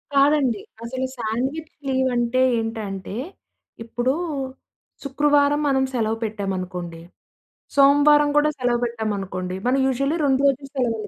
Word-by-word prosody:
కాదండి. 275 -5 +3 0.2
అసలు 260 +2 -3
sandwich 260 +8 -3 0.2
leave 260 0 +1
అంటే 240 +1 +1 0.2
ఏంటంటే, 210 -4 -5 0.7
ఇప్పుడు 240 +3 -1 0.9
శుక్రవారం 290 +1 +2
మనం 265 -1 +2
సెలవు 225 -2 0
పెట్టామనుకోండి, 185 -5 -4 0.7
సోమవారం 290 +1 +6
కూడా 300 +1 +4
సెలవు 245 -1 +1
పెట్టామనుకోండి. 195 -5 -3
మనం 260 +2 +2
యూజువల్లీ 275 +5 0
2 270 -1 +2
రోజులు 275 0 -1
సెలవులు 225 -5 -1
250 Hz, 110 wpm, -22 LUFS, 215-275 Hz, 0.9 s, సోమవారం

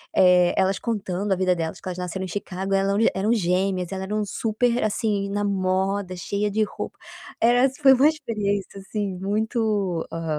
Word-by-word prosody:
eh, 180 -1 +5
elas 190 0 +2
contando 200 -3 -2
a - - +4
vida 185 -1 +2
delas 165 -2 -3
porque - - -7
elas 180 0 -5
nasceram 180 +1 -4
em - - -6
Chicago 190 +1 -4
elas 195 0 +2
eram 225 - +4
eram 210 +4 +1
gêmeas 185 -2 0
elas 190 0 -4
eram 210 +2 -1
super, 235 +4 0
assim, 205 -2 0
na 205 +1 -1
moda 190 -1 0
cheia 200 +4 -2
de 215 +2 +1
roupa. 210 - -6 0.4
Era 245 +2 +4
assim 265 -1 -4
foi 270 -1 +8
uma 265 +3 +5
experiência 210 -10 -2
assim 200 0 -3
muito, 205 -2 -1
hã, 165 0 -5
200 Hz, 185 wpm, -24 LUFS, 185-215 Hz, 0.4 s, foi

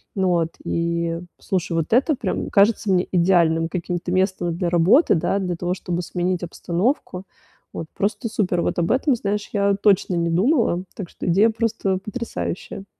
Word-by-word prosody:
Ну 190 -2 +1
вот, 170 -2 +1
и 170 0 -1 0.2
слушай, 185 -4 -2
вот 165 -2 -1
это 275 +5 +3
прям - - -3
кажется 205 0 +3
мне 180 -1 +2
идеальным 170 -2 +3
каким-то 175 0 -3
местом 185 -2 0
для 175 -1 0
работы, 180 - +4
да, 170 +4 0
для 180 -2 -2
того, 175 +1 -2
чтобы 175 -1 -3
сменить 180 0 -2
обстановку. 180 - -2 0.5
Вот, 165 - -5
просто 205 +3 -2
супер, 190 -6 0
вот - - -1
об 170 - 0
этом, 265 +1 +2
знаешь, 210 -2 -3
я 200 -1 +2
точно 195 -2 +2
не 170 0 0
думала. 190 - +2
Так 190 -5 -6
что - - -7
идея 195 +6 +4
просто 220 -4 -1
потрясающая. 210 -3 -5
185 Hz, 165 wpm, -22 LUFS, 170-205 Hz, 0.5 s, работы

